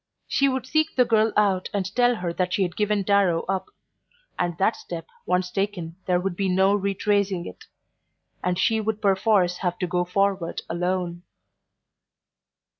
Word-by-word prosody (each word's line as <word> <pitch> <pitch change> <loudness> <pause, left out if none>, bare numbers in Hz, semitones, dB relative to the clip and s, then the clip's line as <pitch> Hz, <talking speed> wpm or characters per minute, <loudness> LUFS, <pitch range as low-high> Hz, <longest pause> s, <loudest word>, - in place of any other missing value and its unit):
She 275 0 +2
would 260 -1 -2
seek 310 +4 0
the 250 - +4
girl 220 -1 +3
out 195 -3 +2
and 195 0 -2
tell 245 0 +4
her 180 -5 -3
that 180 +1 -1
she 195 - +2
had 175 -2 -3
given 210 -1 +1
Darrow 195 -4 +2
up; 190 0 -2 0.7
and 175 -2 -1
that 205 +4 +2
step 165 -2 -7 0.2
once 180 0 +1
taken 195 -5 -3
there 180 -1 +3
would 185 0 -2
be 195 +1 0
no 190 +2 +3
retracing 200 -2 0
it, 90 - -10 0.8
and 180 0 0
she 220 +4 +2
would 215 0 -2
perforce 195 -3 +2
have 180 -2 -2
to 180 - -1
go 180 0 0
forward 185 -1 -1
alone. 175 0 -2
190 Hz, 165 wpm, -24 LUFS, 180-205 Hz, 0.8 s, the